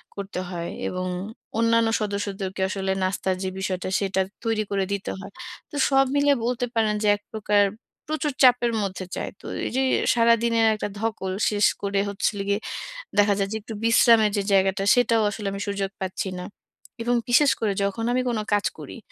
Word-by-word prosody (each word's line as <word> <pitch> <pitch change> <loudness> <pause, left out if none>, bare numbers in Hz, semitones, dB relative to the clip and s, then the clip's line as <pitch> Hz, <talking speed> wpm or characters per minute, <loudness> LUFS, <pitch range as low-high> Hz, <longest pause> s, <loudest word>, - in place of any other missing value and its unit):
করতে 200 -2 -5
হয় 170 -2 -4 0.2
এবং 185 0 -3 0.5
অন্যান্য 230 0 +3
সদস্যদেরকে 200 -2 -3
আসলে 190 -1 -2
নাস্তার 185 0 0
যে 190 - -1
বিষয়টা 185 -1 -2
সেটা 190 -1 0 0.2
তৈরি 225 -2 0
করে 195 -1 +1
দিতে 200 -1 -3
হয়। 195 +1 -9 0.4
তো - - -8
সব 270 -1 +4
মিলে 285 0 +4
বলতে 245 0 0
পারেন, 220 -2 +2
যে - - +2
এক 205 - -12
প্রকার 210 -1 +3 0.5
প্রচুর 305 -2 -1
চাপের 245 -2 +5
মধ্যে 195 -1 -4
যায়। - - -4
তো - - -16 0.2
এই - - -3
যে 265 - +3 0.3
সারাদিনের 230 -1 +3
একটা 210 - -3
ধকল 205 -4 -2 0.2
শেষ 205 0 +2 0.2
করে 200 0 0
হচ্ছে 200 - 0
হলো 200 -1 -3
গিয়ে, 200 0 +2 0.6
দেখা 205 0 +5
যায় 195 -1 0
যে - - -1
একটু 220 - -8
বিশ্রামের 230 -1 +5
যে 200 - +1
জায়গাটা, 195 0 +3
সেটাও 230 -2 +3
আসলে 210 0 -6
আমি 200 - -5
সুযোগ 200 -1 -2
পাচ্ছি 190 +1 -3
না। 180 - -5 0.6
এবং 240 +1 +1
বিশেষ 270 +4 +5
করে 215 -3 +1
যখন 200 +3 -1
আমি 255 +1 +1
কোনো 225 -3 -1
কাজ 205 0 +2
করি, - - -9
205 Hz, 180 wpm, -24 LUFS, 195-230 Hz, 0.6 s, চাপের